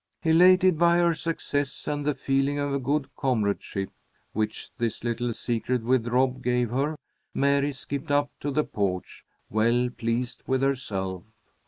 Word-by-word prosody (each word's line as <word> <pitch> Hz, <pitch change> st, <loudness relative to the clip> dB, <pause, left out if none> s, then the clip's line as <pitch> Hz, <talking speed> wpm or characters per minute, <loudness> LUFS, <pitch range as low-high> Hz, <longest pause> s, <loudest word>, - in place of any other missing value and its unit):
Elated 180 Hz, +1 st, +5 dB
by 170 Hz, 0 st, +5 dB
her 170 Hz, -1 st, +4 dB
success 145 Hz, -3 st, -3 dB
and 145 Hz, -1 st, -1 dB
the 150 Hz, -, +1 dB
feeling 135 Hz, +1 st, 0 dB
of 140 Hz, -1 st, -1 dB
good 140 Hz, +1 st, 0 dB
comradeship 105 Hz, -6 st, -1 dB, 0.4 s
which 110 Hz, 0 st, -2 dB
this 115 Hz, -2 st, -2 dB
little 120 Hz, 0 st, -1 dB
secret 120 Hz, +1 st, -1 dB
with 120 Hz, 0 st, +2 dB
Rob 130 Hz, +1 st, +1 dB
gave 125 Hz, -2 st, +1 dB
her, 140 Hz, +5 st, 0 dB, 0.4 s
Mary 140 Hz, +1 st, +2 dB
skipped 140 Hz, +1 st, -6 dB
up 145 Hz, 0 st, +4 dB
on -, -, -27 dB
to 145 Hz, -, -3 dB
the 150 Hz, +2 st, +1 dB
porch, 95 Hz, -7 st, -3 dB, 0.3 s
well 115 Hz, +3 st, +2 dB
pleased 120 Hz, +1 st, -2 dB
with 130 Hz, 0 st, +1 dB
herself. 95 Hz, -9 st, -1 dB
130 Hz, 150 wpm, -26 LUFS, 115-145 Hz, 0.4 s, Elated